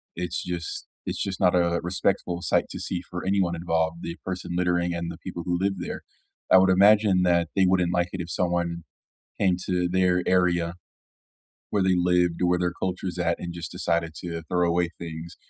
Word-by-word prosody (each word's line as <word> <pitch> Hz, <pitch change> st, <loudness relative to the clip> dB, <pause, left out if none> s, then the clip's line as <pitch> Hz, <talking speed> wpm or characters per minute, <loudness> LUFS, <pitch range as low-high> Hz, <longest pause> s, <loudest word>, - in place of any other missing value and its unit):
It's 90 Hz, 0 st, -2 dB
just 85 Hz, -2 st, -4 dB, 0.2 s
It's -, -, -2 dB
just 95 Hz, -2 st, -2 dB
not 90 Hz, -2 st, +4 dB
a 85 Hz, -1 st, +2 dB
respectful 90 Hz, 0 st, -1 dB
sight -, -, +2 dB
to -, -, -6 dB
see 90 Hz, -, -3 dB
for 90 Hz, 0 st, -6 dB
anyone 95 Hz, -3 st, +1 dB
involved- 80 Hz, -1 st, -1 dB
the 85 Hz, -, -5 dB
person 90 Hz, -2 st, -4 dB
littering 90 Hz, -1 st, +1 dB
and 85 Hz, 0 st, -3 dB
the 85 Hz, -, -10 dB
people 90 Hz, -2 st, -6 dB
who 90 Hz, -, 0 dB
live 95 Hz, 0 st, 0 dB
there.- 90 Hz, -, -5 dB, 0.5 s
I -, -, +9 dB
would 95 Hz, 0 st, +5 dB
imagine 100 Hz, 0 st, +5 dB
that 85 Hz, -2 st, +2 dB
they 95 Hz, -, +4 dB
wouldn't 90 Hz, -1 st, +2 dB
like 90 Hz, 0 st, +1 dB
it 95 Hz, -, -4 dB
if 85 Hz, -, -7 dB
someone 85 Hz, -1 st, -1 dB, 0.5 s
came 95 Hz, -3 st, +3 dB
to 90 Hz, -1 st, +1 dB
their 90 Hz, 0 st, +2 dB
area 85 Hz, -2 st, +2 dB, 0.9 s
where 100 Hz, -2 st, +1 dB
they 95 Hz, -1 st, +3 dB
lived 90 Hz, -1 st, +2 dB
or 90 Hz, -, +3 dB
where 90 Hz, 0 st, +2 dB
their 90 Hz, 0 st, 0 dB
culture's 90 Hz, 0 st, -4 dB
at 85 Hz, -1 st, 0 dB
and 85 Hz, -1 st, -5 dB
just 85 Hz, -2 st, -6 dB
decided 85 Hz, -1 st, -1 dB
to 85 Hz, -2 st, -5 dB
throw 90 Hz, +2 st, +1 dB
away 85 Hz, +1 st, +2 dB
things 85 Hz, 0 st, -7 dB
90 Hz, 195 wpm, -25 LUFS, 85-90 Hz, 0.9 s, I